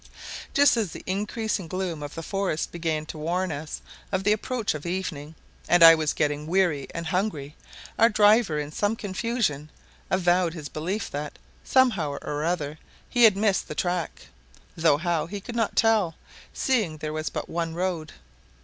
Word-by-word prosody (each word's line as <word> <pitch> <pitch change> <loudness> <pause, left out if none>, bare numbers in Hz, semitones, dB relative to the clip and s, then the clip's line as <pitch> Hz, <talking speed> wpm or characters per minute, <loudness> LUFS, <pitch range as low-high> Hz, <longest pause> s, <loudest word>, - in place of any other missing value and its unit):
Just 285 -3 +5
as 215 -5 0
the - - -9
increasing 210 0 -2
gloom 180 -3 -3
of 145 -1 -7
the 165 - -5
forest 195 -3 -2
began 160 -2 -2
to 155 - -8
warn 175 +3 -1
us 150 +1 -6 0.3
of 190 -1 0
the 205 - +3
approach 225 +1 -1
of 150 -1 -6
evening, 165 -4 -4 0.3
and 175 0 +6
I 165 0 +12
was 155 -2 +1
getting 150 0 -1
weary 170 -6 +1
and 170 0 -5
hungry, 160 -6 -2 0.4
our 230 - +7
driver, 210 -5 +4
in 150 0 -3
some 205 +7 0
confusion, 195 - -2 0.4
avowed 180 -2 +2
his 150 -3 -7
belief 185 +7 -3
that, 145 +1 -5 0.3
somehow 215 - +2
or 145 +1 -4
other, 155 -3 -2 0.3
he 240 -2 +6
had 210 -3 +5
missed 200 -2 +1
the 150 - -6
track, 175 0 -2 0.5
though 160 -3 +3
how, 170 0 -1
he 200 +3 -5
could 235 +4 -8
not 225 -2 0
tell, 215 -7 +3 0.4
seeing 215 - 0
there 155 0 -4
was 155 0 -2
but - - -5
one 165 -1 -3
road. 175 -4 -2
175 Hz, 170 wpm, -26 LUFS, 155-205 Hz, 0.5 s, I